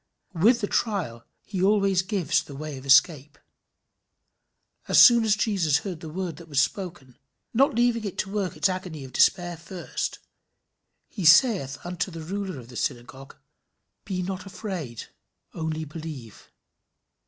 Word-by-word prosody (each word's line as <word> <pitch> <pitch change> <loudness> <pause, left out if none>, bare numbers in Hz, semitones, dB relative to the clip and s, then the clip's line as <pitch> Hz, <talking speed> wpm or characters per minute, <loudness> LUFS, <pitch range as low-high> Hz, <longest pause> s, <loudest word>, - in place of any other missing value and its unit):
With 225 +8 +3
the 205 - -1
trial 175 - -2 0.2
he 195 -3 -4
always 195 -1 +3
gives 190 -3 0
the 140 - -11
way 150 +1 -6
of 135 - -12
escape. 140 +1 +4 1.5
"As - - +4
soon 235 -1 +8
as 215 -2 +3
Jesus 190 -9 +1
heard 180 -5 -5
the 160 - -8
word 175 -1 -4
that 170 - -12
was 140 -2 +1
spoken" 175 - -3 0.3
not 265 +1 +3
leaving 235 -1 +2
it 200 - -5
to 195 - -3
work 200 -3 -2
its - - +3
agony 185 -5 -5
of 130 - -11
despair 175 -1 +2
first 175 +2 -5 0.9
"he 200 - -7
saith 170 - +5
unto 180 +2 -3
the 165 -2 -8
ruler 190 -2 -4
of 120 -1 -13
the 125 - -12
synagogue, 130 +3 -5 0.7
Be 185 -1 -3
not 185 +1 -5
afraid; 180 - -6 0.5
only 160 -1 -3
believe." 150 -8 -9
175 Hz, 150 wpm, -25 LUFS, 150-200 Hz, 1.5 s, soon